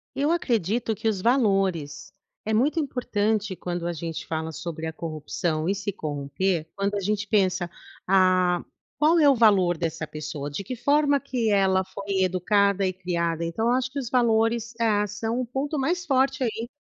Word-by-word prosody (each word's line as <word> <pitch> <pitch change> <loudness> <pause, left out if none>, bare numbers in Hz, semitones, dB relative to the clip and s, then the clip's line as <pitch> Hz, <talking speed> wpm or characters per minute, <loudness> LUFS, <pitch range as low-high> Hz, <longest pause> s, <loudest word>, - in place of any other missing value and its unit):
Eu 290 +3 +1
acredito 230 - 0
que 220 +2 -2
os 200 -4 -1
valores. 195 - +1 0.3
É 220 - -2
muito 295 +8 +2
importante 215 -7 -1
quando 175 -1 -4
a 175 - -1
gente 165 0 -5
fala 160 0 -3
sobre 160 0 -6
a 160 - -3
corrupção 155 +1 -3
e 195 - +2
se 200 0 -3
corromper, 155 +3 -2
quando 200 +1 -1
a - - -1
gente 210 +1 -1
pensa: 185 -4 +1 0.4
"Ah, 185 -2 +3 0.3
qual 320 +3 +4
é 295 - +6
o 275 - +6
valor 195 -6 +4
dessa 160 -1 -3
pessoa? 150 -1 -6
De 190 +7 -5
que 255 - -5
forma 285 +3 +2
que 250 -5 -1
ela 190 -1 +3
foi 195 0 -2
educada 200 +2 +2
e 185 - 0
criada?" 170 -2 -2
Então 170 +8 -2
eu 240 - +3
acho 260 +1 0
que 285 - -4
os 240 - -6
valores, 230 -1 +2
ah, 210 -2 +2
são 225 +4 -3
o 255 - -2
ponto 280 +5 -3
mais 345 +6 0
forte 265 -1 +2
aí. 230 -1 -2
200 Hz, 180 wpm, -25 LUFS, 175-235 Hz, 0.4 s, é